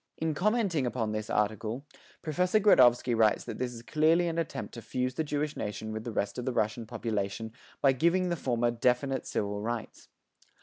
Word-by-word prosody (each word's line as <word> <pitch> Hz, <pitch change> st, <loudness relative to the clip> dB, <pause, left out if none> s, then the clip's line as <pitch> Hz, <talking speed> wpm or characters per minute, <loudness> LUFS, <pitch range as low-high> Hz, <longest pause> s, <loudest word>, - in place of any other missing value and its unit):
In 160 Hz, -1 st, -1 dB
commenting 190 Hz, -, +1 dB
upon 115 Hz, -3 st, -2 dB
this 110 Hz, 0 st, -4 dB
article, 110 Hz, +5 st, -1 dB, 0.4 s
Professor 180 Hz, +6 st, +2 dB
Gradovsky 125 Hz, -, +5 dB
writes 110 Hz, -2 st, +3 dB
that -, -, -7 dB
this 125 Hz, -1 st, -1 dB
is 115 Hz, -1 st, -10 dB
clearly 160 Hz, +6 st, +3 dB
an 165 Hz, 0 st, -1 dB
attempt 145 Hz, -4 st, -4 dB
to 115 Hz, -, -7 dB
fuse 125 Hz, +2 st, -2 dB
the 160 Hz, -, -1 dB
Jewish 150 Hz, 0 st, -2 dB
nation 105 Hz, +1 st, -4 dB
with 110 Hz, 0 st, -5 dB
the 120 Hz, -, -3 dB
rest 100 Hz, +1 st, -2 dB
of 125 Hz, -, -4 dB
the 130 Hz, -, -1 dB
Russian 110 Hz, +1 st, -1 dB
population 110 Hz, 0 st, -3 dB, 0.3 s
by 135 Hz, -, +6 dB
giving 170 Hz, +7 st, +2 dB
the 170 Hz, -, 0 dB
former 120 Hz, -5 st, 0 dB
definite 125 Hz, +3 st, 0 dB
civil 100 Hz, 0 st, -2 dB
rights. 115 Hz, +1 st, -5 dB
125 Hz, 185 wpm, -29 LUFS, 110-155 Hz, 0.4 s, by